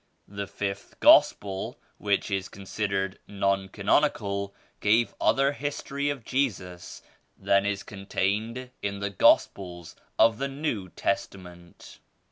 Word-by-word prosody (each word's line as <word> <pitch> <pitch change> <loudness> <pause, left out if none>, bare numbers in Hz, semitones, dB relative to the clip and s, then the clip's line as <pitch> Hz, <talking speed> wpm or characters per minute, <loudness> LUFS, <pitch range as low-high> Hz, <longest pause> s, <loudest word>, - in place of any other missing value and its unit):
The 100 0 -5
5th 100 0 -5
Gospel 95 -1 +4 0.2
which 100 0 0
is 95 -1 -1
considered 100 0 -3
non 100 -1 0
canonical 100 -2 0 0.2
gave 110 +3 +3
other 135 +1 +3
history 145 0 -3
of 135 -6 -4
Jesus 95 -10 -3 0.3
than 100 0 +2
is 100 -1 -2
con 100 -1 -10
tained 115 +7 -1
in 100 0 -2
the 100 0 -2
Gospels 90 -2 +2 0.2
of 110 0 +4
the 140 - 0
New 135 -9 -3
Testament. 90 -2 -5
100 Hz, 115 wpm, -27 LUFS, 95-115 Hz, 0.3 s, Gospel